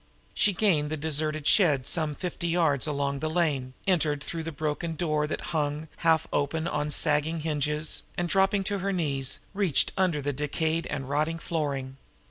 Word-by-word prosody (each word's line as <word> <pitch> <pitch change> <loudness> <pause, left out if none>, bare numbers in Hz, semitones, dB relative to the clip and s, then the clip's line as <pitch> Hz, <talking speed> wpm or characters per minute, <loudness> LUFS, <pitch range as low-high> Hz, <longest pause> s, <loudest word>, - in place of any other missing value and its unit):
She 205 - +3
gained 175 -7 +2
the 155 - -2
deserted 155 0 -1
shed 150 -9 +4
some 155 -1 -1
fifty 175 0 -3
yards 160 -5 +2
along 140 -1 -1
the 155 - -1
lane, 145 -6 0
entered 155 -6 +1
through 165 +1 -4
the 165 +1 -4
broken 155 +2 -2
door 150 -2 0
that - - -3
hung, 150 0 -1
half 165 -2 +3
open, 160 +3 0
on 150 -2 -1
sagging 150 +2 +1
hinges, 150 0 0 0.2
and, 175 - 0
dropping 195 +2 +2
on 200 - 0
her 195 +2 -1
knees, 140 -7 -1
reached 195 -7 +2
in 190 - 0
under 170 -5 +1
the 145 0 -2
decayed 160 +4 -1
and 135 -3 -4
rotting 155 +4 0
flooring. 140 -6 -3
155 Hz, 175 wpm, -27 LUFS, 145-165 Hz, 0.2 s, shed